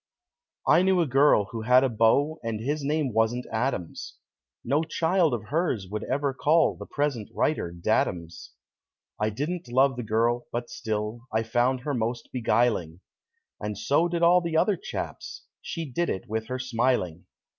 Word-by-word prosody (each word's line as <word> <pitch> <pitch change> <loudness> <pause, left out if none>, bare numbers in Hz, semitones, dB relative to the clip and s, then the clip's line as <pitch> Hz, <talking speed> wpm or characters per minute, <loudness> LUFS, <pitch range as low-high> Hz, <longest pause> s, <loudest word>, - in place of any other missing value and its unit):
I - - +5
knew 190 -1 +3
a 170 - +3
girl 135 -6 +4
who 115 - -4
had 125 +3 +5
a - - +3
beau 130 +7 +2
And 115 -2 -3
his 145 +6 -2
name 145 -3 0
wasn't 115 +3 +1
Adams 110 -7 -3 0.5
No 145 +3 +1
child 165 +1 +1
of 110 -3 -4
hers 145 - 0
would 105 0 -3
ever 140 +1 -1
call 155 +5 +3
The - - -9
present 140 -7 -2
writer 145 - 0
"daddums." 85 -2 -1 0.7
I 105 0 +1
didn't 155 +10 -4
love 130 +2 +3
the - - -2
girl, 115 +2 0
but 120 0 -4
still 110 +1 -4
I 110 +1 +1
found 120 +3 +1
her 145 +2 -3
most 120 -1 -2
beguiling; 110 -8 +1 0.6
And 105 -1 -4
so 145 +10 +2
did 170 0 -2
all 175 +1 +6
the 165 -2 -1
other 205 +4 +3
chaps - - -6 0.2
She 165 - -5
did 170 +5 -2
it 95 - -4
with 110 +1 -3
her 130 - -3
smiling. 120 -9 -1
125 Hz, 165 wpm, -26 LUFS, 110-150 Hz, 0.7 s, all